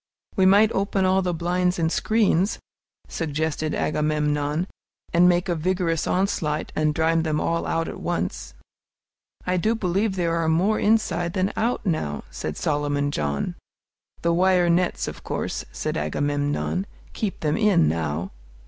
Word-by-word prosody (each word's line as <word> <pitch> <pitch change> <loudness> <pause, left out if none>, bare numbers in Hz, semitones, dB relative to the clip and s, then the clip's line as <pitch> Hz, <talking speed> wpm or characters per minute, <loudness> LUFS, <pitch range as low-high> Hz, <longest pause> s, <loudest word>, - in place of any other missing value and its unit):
"We 190 -3 +4
might 205 +3 +6
open 195 -1 0
all 190 +1 +3
the 180 -1 0
blinds 180 +2 0
and 165 -1 +1
screens," 205 -3 +2 0.5
suggested 155 -1 -2
Agamemnon, 150 +1 0 0.5
"and 175 +1 +6
make 175 +2 +2
a 175 - +1
vigorous 170 -1 0
onslaught 170 -5 0
and 155 -1 +1
drive 165 +1 +2
them 155 -2 0
all 170 0 -1
out 165 0 0
at - - -6
once." 175 - -3 0.9
"I 180 0 +1
do 220 +6 +1
believe 195 0 0
there 170 -2 0
are 165 -1 +1
more 185 +7 +2
inside 175 -6 +1
than 190 0 0
out 235 +1 -1
now," 155 - -1
said 80 - -5
Solomon 145 -1 0
John. 70 - -2 0.7
"The 170 0 +2
wire 180 0 +3
nets, 180 +1 +1
of - - -7
course," - - -3
said - - -3
Agamemnon, 145 - -1 0.3
"keep 210 -4 -3
them 150 -1 +1
in 210 - +4
now." 80 +2 -2
170 Hz, 150 wpm, -24 LUFS, 150-185 Hz, 0.9 s, might